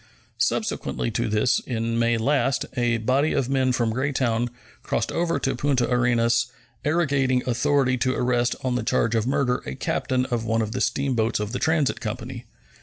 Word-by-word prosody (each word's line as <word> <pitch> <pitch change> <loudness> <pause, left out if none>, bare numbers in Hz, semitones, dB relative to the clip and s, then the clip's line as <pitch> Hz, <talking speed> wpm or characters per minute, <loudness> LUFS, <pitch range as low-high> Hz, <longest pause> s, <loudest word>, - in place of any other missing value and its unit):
Subsequently 60 -1 -1
to - - -1
this, 110 +3 +2
in 115 -1 -2
May 115 0 +2
last, 135 +2 +1
a 120 -2 +1
body 130 +7 +1
of 130 - 0
men 130 -1 +2
from 120 -2 +1
Greytown 125 -3 0 0.3
crossed - - -1
over 170 0 0
to 135 - -1
Punta 125 -1 +1
Arenas, 120 -1 +2 0.4
arrogating 140 -5 +1
authority 130 +1 +2
to 130 +1 +1
arrest 125 -1 +1
on 130 -1 0
the 125 - 0
charge 115 0 +1
of 115 0 +1
murder 130 -2 +1
a - - -4
captain 130 -1 -1
of 120 -3 -2
one 115 0 +1
of 110 - -4
the 125 - -3
steamboats 120 -6 0
of 105 0 -3
the 125 - -3
Transit 160 -4 +1
Company. - - -6
125 Hz, 175 wpm, -24 LUFS, 115-135 Hz, 0.4 s, this